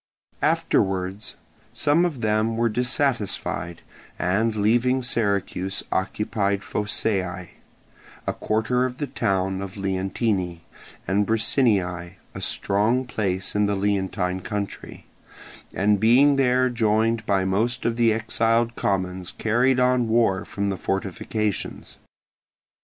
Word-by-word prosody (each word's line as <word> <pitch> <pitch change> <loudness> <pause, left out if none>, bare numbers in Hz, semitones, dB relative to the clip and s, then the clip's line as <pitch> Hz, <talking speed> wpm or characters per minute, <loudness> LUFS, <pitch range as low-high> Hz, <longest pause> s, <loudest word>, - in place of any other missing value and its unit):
Afterwards 95 +2 0 0.4
some 160 +4 +3
of 150 -9 -3
them 110 +1 +1
were 115 0 +2
dissatisfied, 120 - -1 0.3
and 105 +6 +1
leaving 120 +5 +2
Syracuse 100 -4 -1
occupied 100 +1 -1
Phocaeae, 95 -4 -1 0.8
a - - -1
quarter 115 +4 0
of 125 0 -4
the 145 - -2
town 95 -6 -1
of 100 0 -7
Leontini, 95 -2 -1 0.5
and 100 +2 +1
Bricinniae, 100 -6 +1 0.2
a - - -7
strong 110 +6 +1
place 95 -6 -2
in 105 0 +3
the 100 - 0
Leontine 95 -2 -1
country, 100 +2 -6 0.7
and 100 +1 +2
being 130 +7 +5
there 130 -1 +3
joined 110 -1 +1
by 95 -2 +2
most 115 +6 0
of 115 - +1
the 115 -1 +3
exiled 115 +1 +1
commons 95 -2 -1
carried 125 +4 +2
on 125 -1 +3
war 110 -5 +2
from 100 0 -2
the 95 - -2
fortifications. 105 +2 -3
105 Hz, 115 wpm, -24 LUFS, 95-115 Hz, 0.8 s, being